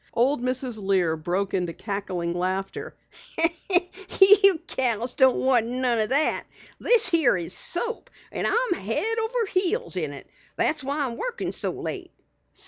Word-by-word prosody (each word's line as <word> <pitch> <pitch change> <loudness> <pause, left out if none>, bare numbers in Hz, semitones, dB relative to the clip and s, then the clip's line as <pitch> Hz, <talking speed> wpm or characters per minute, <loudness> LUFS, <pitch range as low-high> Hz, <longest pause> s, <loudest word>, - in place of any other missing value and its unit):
Old 255 +3 +2
Mrs. 255 -3 -1
Lear 185 -4 +1
broke 180 +5 -3
into 180 -3 -1
cackling 190 -5 -4
laughter. 190 - -4 1.2
"You 390 -2 +7
gals 240 -1 0
don't 260 -2 +4
want 250 -4 +2
none 250 -1 -1
o' 215 - +1
that! 280 +5 +2 0.4
This 470 -4 +4
here 320 - +3
is 175 0 -5
soap 470 +6 -4 0.2
and - - -2
I'm - - +1
head 420 - 0
over 455 +1 -1
heels 395 +6 0
in - - -2
it. - - -11 0.3
That's 300 -2 0
why 285 +2 -2
I'm 235 -2 -5
workin' 485 -1 -4
so - - -2
late." - - -6
255 Hz, 145 wpm, -24 LUFS, -, 1.2 s, You